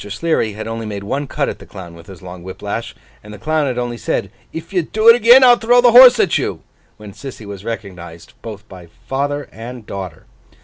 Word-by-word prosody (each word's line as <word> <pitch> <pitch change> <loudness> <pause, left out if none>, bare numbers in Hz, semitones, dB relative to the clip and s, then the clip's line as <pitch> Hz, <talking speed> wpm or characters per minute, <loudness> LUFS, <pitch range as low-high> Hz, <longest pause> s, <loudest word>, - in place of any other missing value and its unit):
Sleary 110 -1 -1
had 110 +2 -7
only 115 0 -5
made 100 -1 -6
one 135 +7 -3
cut - - -2
at - - -6
the - - -13
Clown 90 -3 -11
with 85 0 -15
his 95 -3 -13
long 90 -1 -10
whip 95 +1 -11
lash, - - -5 0.3
and 105 - -12
the 105 - -10
Clown 155 +5 -1
had 125 -2 -3
only 120 -1 -4
said, - - -3 0.2
'If 165 +3 -9
you 180 - +2
do 215 +7 -2
it 230 - +9
again, 240 +3 +6
I'll 245 -1 +7
throw 240 +2 +3
the 245 -1 +5
horse 250 0 +8
at 195 - +2
you!' - - -4 0.3
when 105 -2 -12
Sissy 130 -3 -10
was 100 -1 -9
recognised 90 -7 -8
both 110 -2 -10
by 90 -4 -13 0.2
father 145 +2 -3
and 120 0 -10
daughter. 95 -6 -8
115 Hz, 225 wpm, -17 LUFS, 100-160 Hz, 0.3 s, it